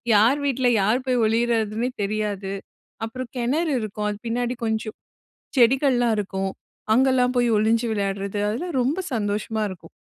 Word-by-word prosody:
யார் 235 +8 +5
வீட்ல 260 -2 +1
யார் 240 +6 +1
போய் 250 -2 +2
ஒளியறதுன்னே 225 0 +1
தெரியாது. 200 -2 -2 0.5
அப்புறம் 255 +1 -6
கெணறு 295 +7 0
இருக்கும். 210 0 -3
அது 205 - -4
பின்னாடி 245 +2 -1
கொஞ்சம் 220 0 -2 0.6
செடிகள்லாம் 245 -2 +4
இருக்கும். 190 -1 -2 0.4
அங்கலாம் 255 -1 +3
போய் 240 -1 +3
ஒளிஞ்சு 225 +2 +2
விளையாட்றது, 200 0 -2
அதெல்லாம் 270 +6 -3
ரொம்ப 285 +9 0
சந்தோஷமா 215 0 -1
இருக்கும். 165 -3 -10
230 Hz, 130 wpm, -23 LUFS, 210-250 Hz, 0.6 s, யார்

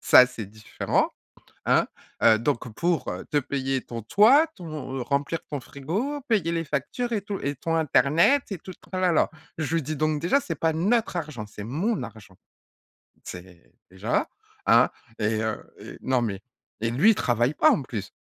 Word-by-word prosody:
ça 125 - +8
c'est 120 -4 -7
différent, 105 +2 -1 0.6
hein? - - +3 0.4
Heu, 110 -1 +7
donc 120 -1 -1
pour 170 +3 0 0.2
te 145 - +3
payer 135 -1 -2
ton 115 -1 -7
toit, 245 - +6
ton 145 -7 -5
remplir 140 +4 -1
ton 145 - -2
frigo, 190 - -3
payer 195 -8 +2
les 165 -1 -1
factures 155 - -2
et 210 - 0
tout 200 0 -5
et 140 +1 0
ton 165 +5 -2
internet 160 - +4
et 195 - -2
tout 185 - -9
le - - -17
tralala». 185 -3 +2 0.3
Je 160 +1 -1
lui 165 - +2
dis: 155 +3 -3
«Donc 155 +1 0
déjà, 180 - +3
c'est 165 - -4
pas 160 +2 +1
notre 205 +7 +1
argent, 150 -10 -5
c'est 105 0 -9
mon 165 - -1
argent». 105 -5 -11 0.9
C'est 90 -1 -11 0.2
déjà, 95 0 -1 0.4
hein - - +6 0.3
et 110 0 +1
heu 110 -1 -2 0.2
et - - -10
non 130 -1 +1
mais 100 -4 -3 0.4
et 115 - +1
lui, 150 - +5
il - - +1
travaille 120 0 +1
pas - - +5
en 140 - +1
plus. 115 -6 -6
145 Hz, 180 wpm, -26 LUFS, 120-175 Hz, 0.9 s, ça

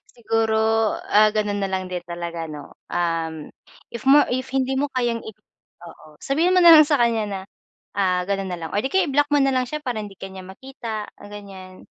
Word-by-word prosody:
Siguro, 225 -1 0 0.5
ah, 215 +1 +5
ganun 205 -1 0
na 195 - 0
lang 185 -1 -2
din 180 -1 -3
talaga 170 -1 -5
'no? 150 -1 -10 0.2
Um, 165 -2 -2 0.4
if 235 - -7
mo 285 +2 +6
if 255 +1 -2
hindi 265 0 0
mo 285 +2 0
kayang 240 -2 0
i 220 - -8 0.5
oo, 165 - -14
sabihin 330 +7 +1
mo 365 - +5
na 340 -1 +9
lang 305 -1 +8
sa 295 - +3
kanya 230 -2 +2
na 195 - -4 0.6
ah, 185 -2 +1
ganun 195 -1 -1
na 180 - -3
lang 160 - -6
or 205 - +1
di 265 - -2
kaya 380 -1 +3
i-block 290 +1 +2
mo - - +5
na 270 - +2
lang 255 -1 0
siya, 300 +1 -5
para 245 -4 -2
hindi 205 -2 -9
ka 195 - -8
niya 190 -1 -9
makita, 220 +1 -7 0.2
ganyan. 195 -2 -11
215 Hz, 210 wpm, -22 LUFS, 185-265 Hz, 0.6 s, na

